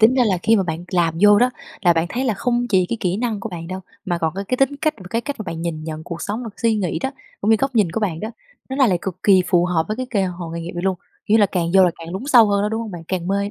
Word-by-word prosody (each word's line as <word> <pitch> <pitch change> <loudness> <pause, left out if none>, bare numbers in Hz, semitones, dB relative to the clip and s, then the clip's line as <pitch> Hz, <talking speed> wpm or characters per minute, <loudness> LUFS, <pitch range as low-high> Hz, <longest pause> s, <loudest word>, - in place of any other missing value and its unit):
tính 220 +4 +6
ra 255 -2 +4
là 190 -4 +1
khi 225 +1 +4
mà 195 - +2
bạn 170 0 -4
làm 170 -3 +2
vô 205 0 +7
đó, 245 +3 +4 0.3
là 175 -3 +5
bạn 165 0 0
thấy 255 +7 -2
là 230 - +1
không 240 +4 0
chỉ 185 -5 +3
cái 235 - -1
kỹ 180 -1 0
năng 225 -2 -2
của - - -4
bạn 165 -2 -7
đâu, 185 +1 -5 0.2
mà 175 -4 -1
còn 160 0 -1
cái 195 +1 -4
cái 255 - +1
tính 270 +2 +1
cách, 310 +1 0
và 190 - -12
cái 230 - 0
cách 285 +3 -5
mà - - -3
bạn 165 -3 -5
nhìn 155 -2 -4
nhận 155 0 -6
cuộc 170 -1 -6
sống, 215 +4 -3
bạn 230 - -6
suy 225 -1 +3
nghĩ 180 -6 -1
đó, 265 - -2 0.3
cũng 210 - +1
như 225 - +6
góc 270 +3 -1
nhìn 205 -7 +3
của 225 - -2
bạn 175 -7 -1
đó, 215 - -4 0.4
nó 265 - -4
lại 265 -3 +4
là 185 - +3
cực 185 -1 -5
kỳ 190 -3 +5
phù 175 -2 +3
hợp 175 -3 +1
với 215 - -2
cái 255 +1 -3
kê 205 -4 +1
hội 175 -2 -5
nghề 170 - -4
nghiệp 170 - -6
này 175 - -4
luôn, 190 -1 +1 0.3
kiểu 210 - +3
như - - +4
là, 205 - +6
càng 180 -3 -1
vô 190 - +7
là 180 - +3
càng 165 +1 -8
lún 190 - -4
sâu 245 -6 +7
hơn 200 0 +2
đó, 210 - +1
đúng 220 +1 -2
hông 225 -2 -5
bạn? 175 -3 -7
Càng 180 -2 -2
mê. 200 +1 0
195 Hz, 345 wpm, -21 LUFS, 175-225 Hz, 0.4 s, vô